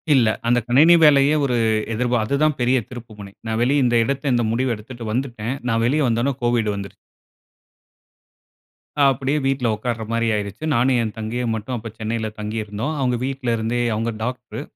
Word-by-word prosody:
"இல்ல. 120 -4 +4 0.2
அந்த 120 +1 +4
கணினி 150 +8 +6
வேலையே 145 -1 +6
ஒரு 125 -3 0 0.4
எதிர்ப்பார் 120 0 0
அதுதான் 145 +4 +1
பெரிய 125 +2 +3
திருப்பு 120 -3 -10
முனை." 100 -1 -10
நான் 110 0 -1
வெளிய 135 +2 +2
இந்த 120 -1 +2
இடத்தை 140 +2 -2
இந்த 120 -1 +1
முடிவ 120 +1 0
எடுத்துட்டு 115 +2 -9
வந்துட்டேன். 120 -1 -3
நான் 115 0 +1
வெளிய 145 +5 +2
வந்த 115 -1 +1
உடனே 140 +1 +1
கோவிட் 120 -3 +1
வந்துருச்சு. 100 -1 -7 2.1
அப்டியே 135 +2 +2
வீட்ல 135 -3 0
உட்காருற 115 +1 -3
மாரி 115 0 +1
ஆயிருச்சு. 100 +5 -5
நானும் 125 +2 +3
என் 110 -1 -3
தங்கையும் 115 +2 -2
மட்டும் 110 +4 -4
அப்ப 115 -1 -7
சென்னையில 110 0 -2
தங்கியிருந்தோம். 110 +6 -3
அவங்க 125 -2 +1
வீட்லருந்தே, 120 -3 -1
அவங்க 115 +2 -1
டாக்டரு 125 +2 -5
120 Hz, 165 wpm, -21 LUFS, 110-130 Hz, 2.1 s, கணினி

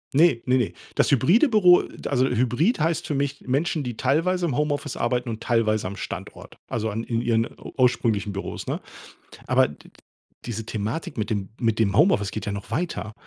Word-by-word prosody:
Ne, 155 -6 +5
ne, 130 0 +3
ne. 105 -9 0 0.2
Das - - +3
hybride 175 - +4
Büro 180 -5 +6 0.2
also, 130 -2 +2
Hybrid 125 - +1
heißt 160 +1 0
für 145 - -1
mich 140 0 -2
Menschen, 150 +4 0
die 120 -3 -5
teilweise 170 +7 +1
im 140 -7 -1
Homeoffice 145 -1 -1
arbeiten 125 +1 -1
und 110 -1 -5
teilweise 110 -4 +1
am 100 - -6
Standort. - - -8
Also, 110 -1 -2
an 110 +2 -3
in 115 -1 -1
ihren 115 -1 +1 0.3
ursprünglichen 115 -5 +2
Büros, 100 - -5
ne? - - -2 0.7
Aber - - +4
d - - -14
d - - -20 0.6
diese 115 -2 -4
Thematik 115 +6 -4
mit 110 +1 -2
dem 100 -3 -2
mit 115 -1 +1
dem 100 -1 +2
Homeoffice 105 - +4
geht 110 - -5
ja 100 - -2
noch 100 0 -7
weiter. 110 - -3
120 Hz, 190 wpm, -24 LUFS, 110-150 Hz, 0.7 s, Büro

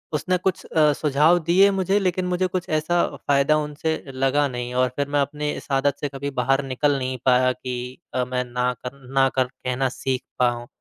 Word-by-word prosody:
उसने 180 +5 0
कुछ 185 +1 -2
अ, 150 -2 +3
सुझाव 150 +4 +3
दिए 185 +5 +5
मुझे 195 +1 +1
लेकिन 185 -1 0
मुझे 180 +1 0
कुछ 180 -1 -3
ऐसा 155 +3 +1 0.2
फ़ायदा 140 +2 +2
उनसे 150 +1 -2 0.2
लगा 135 +2 +2
नहीं 125 -1 -5
और 130 - +2
फिर 140 -1 -1
मैं 145 - +1
अपने 150 +2 -2
इस - - -10
आदत 135 +1 +2
से 145 - -1
कभी 140 +1 -5
बाहर 135 +2 +2
निकल 140 +2 +1
नहीं 130 -1 -3
पाया 130 0 +4
कि 125 0 -6 0.2
अ, 125 0 +1
मैं 125 0 -2
ना 125 +1 -1
कर 125 - -4 0.2
ना 135 0 +4
कर 130 - +3
कहना 130 +1 -2
सीख 130 +1 -3 0.2
पाऊँ। 120 -1 +1
140 Hz, 200 wpm, -23 LUFS, 130-155 Hz, 0.2 s, दिए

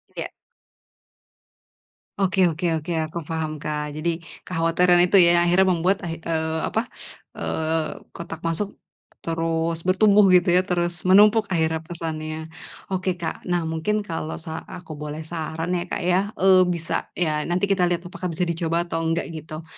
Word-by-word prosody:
Iya. - - -5 1.9
Oke 190 -1 +3
oke 165 +3 -4
oke, 160 +2 -4 0.2
aku 165 +2 -8
paham, 155 0 -3
Kak. 150 0 -4
Jadi 165 +2 -1 0.2
kekhawatiran 175 +1 +3
itu 180 +3 +4
ya 175 -2 +7
yang 175 - +3
akhirnya 190 +2 +4
membuat 185 +3 +1
ah 170 - -3
eee, 160 -1 -2
apa, 220 +7 -1 0.6
eee, 160 0 -2
kotak 165 -1 -8
masuk 180 +5 -1 0.5
terus 165 0 -1
bertumbuh, 205 +2 +5
gitu 180 0 +5
ya, 180 - +5
terus 175 0 0
menumpuk 210 +3 +6
akhirnya 160 -3 0
pesannya. 160 -1 -5 0.4
Oke, 185 -1 0
Kak. 165 - -4
Nah, 175 -1 +1
mungkin 185 +7 0
kalau 165 -4 -4
sa 160 0 -5
aku 180 -3 -9
boleh 150 +1 -5
saran 160 +1 -4
ya, 175 - -2
Kak, - - -3
ya, 180 +1 +3
eee, 185 -1 +5
bisa 170 -2 -2
ya 155 -3 0
nanti 175 +2 -1
kita 180 -2 +3
lihat 175 0 -1
apakah 180 0 -5
bisa 180 +3 -1
dicoba 170 0 0
atau 165 -1 -3
enggak, 165 0 -1
gitu. 155 0 -7
170 Hz, 160 wpm, -23 LUFS, 160-180 Hz, 1.9 s, ya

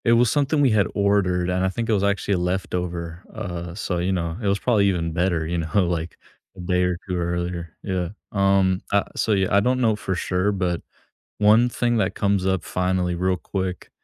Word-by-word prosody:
It 115 - +5
was 120 0 +4
something 145 +1 +2
we 135 -4 +4
had 105 -4 +3
ordered, 95 -3 +2
and 90 +1 0
I 95 - +2
think 115 +4 -3
it 115 - +2
was 100 -2 +1
actually 100 0 +1
a - - +2
leftover. 90 -1 -3
Uh, 90 -5 -5
so, 90 -3 -2
you 90 +2 0
know, 85 -3 -1
it 105 - -1
was 100 0 +2
probably 105 -3 +2
even 85 -4 0
better, 85 -2 0
you 85 +1 -2
know, 85 +3 +1
like, 85 -1 -3 0.4
a - - -11
day 90 0 +1
or 90 -1 0
2 90 - -2
earlier. 85 -1 -3
Yeah. 90 -3 -2 0.2
Um, 95 -2 +2
uh, 100 0 +3
so, 110 - +1
yeah, 95 -2 +1
I - - +7
don't 125 +5 +1
know 115 -4 +3
for 95 -3 -3
sure, 90 +2 0
but 90 -3 -1 0.6
one 110 +4 +5
thing 120 0 0
that 110 - 0
comes 100 -2 +1
up 95 -3 +1
finally 90 0 -1
real 90 +1 +1
quick 95 0 -4
95 Hz, 215 wpm, -23 LUFS, 90-100 Hz, 0.6 s, I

